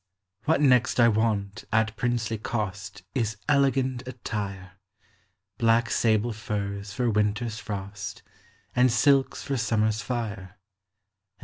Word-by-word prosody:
What 160 Hz, -1 st, +3 dB
next 125 Hz, -3 st, +4 dB
I 120 Hz, -, +7 dB
want, 105 Hz, -2 st, 0 dB
at 110 Hz, 0 st, +2 dB
princely 115 Hz, -2 st, -1 dB, 0.7 s
Is 110 Hz, -4 st, -1 dB
elegant 135 Hz, -3 st, +2 dB
attire: 100 Hz, -6 st, -5 dB, 0.9 s
Black 115 Hz, 0 st, +3 dB
sable 110 Hz, +1 st, +2 dB
t'ni 105 Hz, -3 st, -3 dB
s 100 Hz, 0 st, -9 dB
for 120 Hz, +5 st, -1 dB
winter's 105 Hz, +2 st, 0 dB
fro 100 Hz, -2 st, -5 dB, 0.8 s
And 125 Hz, 0 st, +5 dB
silks 135 Hz, +3 st, +3 dB
for 135 Hz, -, -2 dB
summer's 110 Hz, -2 st, 0 dB
Are, 125 Hz, -, +1 dB, 0.2 s
And 95 Hz, -1 st, -11 dB
110 Hz, 115 wpm, -26 LUFS, 105-125 Hz, 0.9 s, I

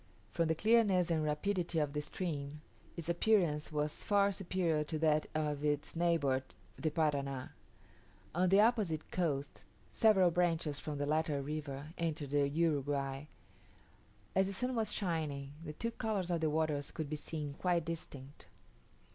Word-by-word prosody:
From 170 Hz, -1 st, +1 dB
the 160 Hz, -, +1 dB
clearness 200 Hz, -3 st, +3 dB
and 160 Hz, -2 st, +1 dB
rapidity 170 Hz, +3 st, -1 dB
of 150 Hz, -2 st, +1 dB
the 150 Hz, -, -1 dB
stream, 150 Hz, -2 st, -4 dB, 0.4 s
its 165 Hz, -1 st, -5 dB
appearance 170 Hz, -4 st, +2 dB
was 150 Hz, 0 st, -2 dB
far 200 Hz, -1 st, +3 dB
superior 180 Hz, -5 st, 0 dB
to 155 Hz, +1 st, -3 dB
that 155 Hz, -1 st, +2 dB
of 150 Hz, -2 st, -1 dB
its 145 Hz, +1 st, 0 dB
neighbour 165 Hz, -6 st, +2 dB, 0.3 s
the 160 Hz, -, -1 dB
Parana. 140 Hz, -4 st, -1 dB, 0.8 s
On 180 Hz, +2 st, +2 dB
the 195 Hz, +2 st, +6 dB
opposite 210 Hz, -9 st, +1 dB
coast, 145 Hz, -6 st, -2 dB, 0.3 s
several 195 Hz, -5 st, +5 dB
branches 165 Hz, -4 st, +1 dB
from 150 Hz, -2 st, -4 dB
the 145 Hz, -, -1 dB
latter 155 Hz, -1 st, +1 dB
river 145 Hz, -1 st, -5 dB
entered 155 Hz, -4 st, -2 dB
the 145 Hz, -1 st, +3 dB
Uruguay. 145 Hz, -3 st, 0 dB, 1.1 s
As 190 Hz, 0 st, +4 dB
the 200 Hz, -, -3 dB
sun 250 Hz, +6 st, -1 dB
was 225 Hz, -3 st, 0 dB
shining, 155 Hz, -7 st, -2 dB
the 155 Hz, -, -6 dB
two 230 Hz, +9 st, -3 dB
colours 210 Hz, -6 st, -2 dB
of 170 Hz, -2 st, 0 dB
the 160 Hz, -, +2 dB
waters 150 Hz, -2 st, 0 dB
could 160 Hz, -2 st, -4 dB
be 155 Hz, -, -3 dB
seen 150 Hz, -1 st, -5 dB
quite 175 Hz, +1 st, 0 dB
distinct. 145 Hz, -4 st, -7 dB
155 Hz, 155 wpm, -34 LUFS, 145-180 Hz, 1.1 s, the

